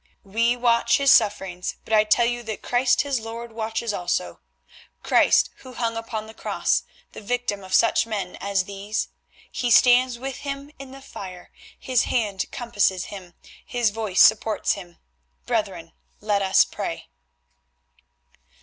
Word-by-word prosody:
We 230 +5 +1
watch 235 -1 +3
his 275 -1 +4
sufferings, 195 -5 +2
but - - -4
I 215 0 +5
tell 235 +2 +3
you 240 0 -1
that 220 -2 -6
Christ 245 0 +2
his 280 -3 -1
Lord 230 +1 -7
watches 225 0 -3
also; 175 - -2 0.6
Christ - - +4
who 255 - -13
hung 230 -1 -2
upon 225 -1 -5
the 220 - -12
Cross, - - -1 0.3
the - - -10
victim 210 -2 -2
of 185 - -11
such 230 0 +3
men 200 -5 -4
as 200 -1 0
these. 200 +3 -4 0.4
He 245 - -2
stands 245 +1 +5
with 265 +1 -5
him 280 0 -6
in 275 -1 -9
the 270 +1 -12
fire, 185 -8 -10 0.3
His 255 -3 +1
hand 210 -6 -1
compasses 205 -7 0
him, 180 -3 -10 0.3
His 240 -4 0
voice 210 -4 +3
supports 220 0 +3
him. 175 -4 -6 0.5
Brethren, - - -2 0.3
let 205 -1 0
us 190 0 +4
pray." - - -6
225 Hz, 150 wpm, -24 LUFS, 200-245 Hz, 0.6 s, I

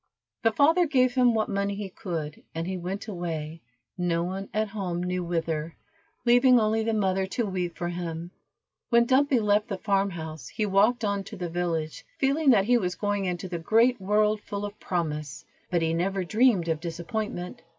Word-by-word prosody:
The 225 - +3
father 325 +8 +4
gave 255 -4 +3
him 245 -2 +4
what 215 -1 +1
money 200 0 -1
he 205 0 -4
could, 165 -6 -5
and 165 +1 -2
he 190 +1 -3
went 185 +4 -5
away, 165 -4 -4 0.4
no 170 -1 +1
one 190 +2 -4
at 215 0 0
home 185 -4 -3
knew 180 0 -1
whither, 165 -2 -2 0.5
leaving 245 +1 +6
only 220 0 +1
the 225 +1 0
mother 190 -2 +1
to 230 +4 -1
weep 180 -3 -3
for 175 - -2
him. 170 -1 -5 0.6
When 235 0 +5
Dumpy 265 +1 +3
left 210 0 +2
the 200 -5 -3
farm 200 0 +1
house 160 -6 -7
he 215 - -2
walked 210 +5 +3
on 200 -1 -1
to 220 - -8
the 175 -2 -4
village, 165 -2 -2
feeling 280 +2 +2
that 205 -6 +5
he 245 +2 +4
was 180 -4 -2
going 205 -1 -1
into 180 +1 -3
the 175 -2 -4
great 225 +7 +3
world 210 +2 +2
full 205 0 -4
of 205 0 -8
promise, 150 -5 -3 0.2
but 175 -2 +1
he 160 0 +1
never 190 +3 0
dreamed 215 -2 +3
of 160 -2 0
disappointment. 175 +2 -4
195 Hz, 190 wpm, -27 LUFS, 175-220 Hz, 0.6 s, leaving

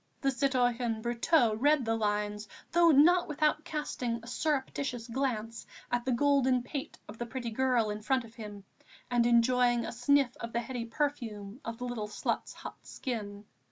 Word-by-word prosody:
The 275 - +1
citoyen 245 -4 +1
Brotteaux 240 +1 +3
read 290 0 +3
the 225 - +1
lines, 210 -1 -1 0.2
though 340 0 +5
not 335 +5 +6
without 305 0 +1
casting 255 -7 -3
a - - -11
surreptitious 265 -3 -2
glance 230 -3 -3 0.2
at 245 0 0
the 260 - +1
golden 260 -1 +3
pate 270 +2 -6
of 215 +2 -11
the 240 - -3
pretty 235 0 -4
girl 245 -2 +2
in 210 +1 -5
front 260 +3 +1
of 230 -1 -13
him 210 -4 -9 0.5
and 240 -1 +3
enjoying 240 0 +3
a - - -4
sniff 250 +1 +2
of 230 0 -7
the 235 - +1
heady 240 -1 -4
perfume 230 -5 -3
of 230 0 -5
the 250 - -5
little 235 -4 -3
slut's 210 - -2
hot - - -9
skin. 210 -5 -5
245 Hz, 170 wpm, -31 LUFS, 225-270 Hz, 0.5 s, not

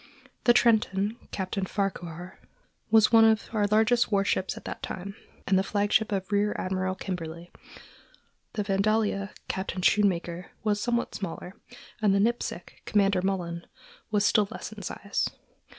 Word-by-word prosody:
The 240 - +7
Trenton, 215 -3 +3
Captain 190 0 -3
Farquhar, 180 -3 -4 0.5
was 220 -1 +5
one 225 -1 +7
of 220 -1 +3
our 210 -2 +2
largest 220 +3 +3
war 200 -1 +2
ships 190 -1 0
at - - -11
that - - -6
time, 195 +2 -6 0.3
and 190 -1 +3
the - - +1
flagship 205 +2 +1
of 195 0 -2
Rear 205 +1 +2
Admiral 185 0 -1
Kimberley; 170 -2 -6 1.0
the 210 - -1
Vandalia, 200 0 +1 0.2
Captain 190 -1 -3
Schoonmaker, 180 -4 +2 0.2
was 210 -1 +1
somewhat 240 0 -1
smaller, 185 -1 -6 0.5
and 205 -2 +4
the - - +3
Nipsic, 235 +4 -2
Commander 200 -2 +2
Mullan, 175 -3 -2 0.4
was 205 -1 +2
still 210 -2 +4
less - - -7
in 215 -1 -9
size. 200 +2 -2
200 Hz, 145 wpm, -27 LUFS, 185-215 Hz, 1.0 s, The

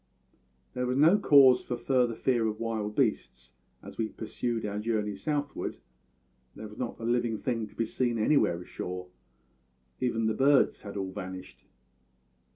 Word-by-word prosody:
"There 125 0 -2
was 125 +1 0
no 165 +8 +5
cause 135 -8 +6
for 120 - -4
further 120 -1 +1
fear 120 -3 +1
of 105 -1 -4
wild 110 -2 -3
beasts 65 - -1 0.3
as - - -11
we 110 - +1
pursued 115 +1 -4
our 105 0 -3
journey 105 -2 -1
southward; 145 +8 -3 0.8
there 110 - -8
was 105 - -13
not 125 -2 -4
a - - -8
living 120 -1 0
thing 115 -2 -2
to - - -20
be 115 - 0
seen 120 +1 -1
anywhere 110 - +2
ashore; 90 0 -6 0.9
even 115 -3 0
the 110 - +1
birds 135 +2 +3
had 100 0 -8
all 95 -1 -3
vanished. 95 0 -8
115 Hz, 160 wpm, -29 LUFS, 105-125 Hz, 0.9 s, cause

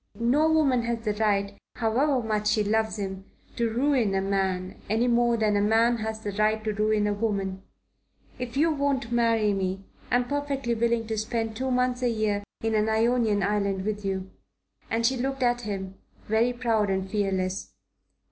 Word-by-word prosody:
No 285 +7 +3
woman 280 -6 +3
has 235 -1 -3
the 210 - +1
right, 200 -2 0 0.2
however 250 +3 +1
much 215 -1 -1
she 215 0 +2
loves 220 +1 0
him, 190 -1 -4 0.3
to 235 -1 0
ruin 240 -4 +1
a 190 - +1
man, 190 -1 -2
any 225 +3 +2
more 240 -1 +3
than 215 -2 +2
a 205 - +2
man 225 +3 +3
has 220 0 -4
the 205 - -3
right 215 +2 +1
to 215 -1 -1
ruin 215 0 +1
a 205 - +1
woman. 200 -3 -2 0.7
But 250 - -4
if 235 - -9
you 320 +3 +4
won't 280 -4 -1
marry 230 -3 +2
me, 190 0 -2 0.3
I'm 245 0 +2
perfectly 280 -3 -1
willing 230 0 +1
to 220 -1 -2
spend 225 0 -2
two 260 +3 -2
months 250 0 +1
a 245 - +2
year 215 -3 0 0.2
in 225 0 0
an 215 0 +2
Ionian 220 -2 +2
island 200 -1 0
with 210 -1 -2
you," 190 -1 -3 0.6
and 230 +1 0
she 260 +2 +2
looked 270 +1 -2
at 245 0 +2
him, 195 -4 -5 0.3
very 225 +3 +2
proud 230 -4 0
and 190 0 -1
fearless. 190 -2 -2
220 Hz, 185 wpm, -26 LUFS, 205-240 Hz, 0.7 s, you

